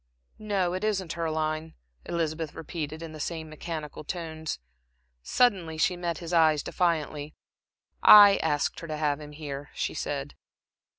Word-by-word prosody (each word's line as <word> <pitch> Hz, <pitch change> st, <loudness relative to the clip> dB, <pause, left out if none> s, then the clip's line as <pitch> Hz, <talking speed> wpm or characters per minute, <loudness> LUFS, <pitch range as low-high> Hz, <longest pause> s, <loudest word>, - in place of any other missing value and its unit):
"No, 195 Hz, -4 st, 0 dB
it 185 Hz, +2 st, -3 dB
isn't 190 Hz, -6 st, -1 dB
her 165 Hz, -2 st, -2 dB
line," 155 Hz, 0 st, -2 dB, 0.3 s
Elizabeth 160 Hz, -2 st, -2 dB
repeated, 160 Hz, 0 st, -5 dB
in 165 Hz, -, -7 dB
the 155 Hz, -, -9 dB
same 160 Hz, +1 st, -4 dB
mechanical 155 Hz, -1 st, -6 dB
tones. 160 Hz, -1 st, -4 dB, 0.6 s
Suddenly 180 Hz, -, +2 dB
she 180 Hz, +3 st, +2 dB
met 175 Hz, -2 st, -3 dB
his 170 Hz, 0 st, -6 dB
eyes 155 Hz, -3 st, +4 dB
defiantly. 155 Hz, -4 st, -1 dB, 0.7 s
"I 205 Hz, -1 st, +10 dB
asked 145 Hz, -1 st, 0 dB
her 165 Hz, -, -8 dB
to 155 Hz, -1 st, -4 dB
have 150 Hz, -1 st, 0 dB
him 150 Hz, 0 st, -10 dB
here," 145 Hz, -2 st, -6 dB
she -, -, -2 dB
said. -, -, -4 dB
160 Hz, 150 wpm, -28 LUFS, 155-175 Hz, 0.7 s, I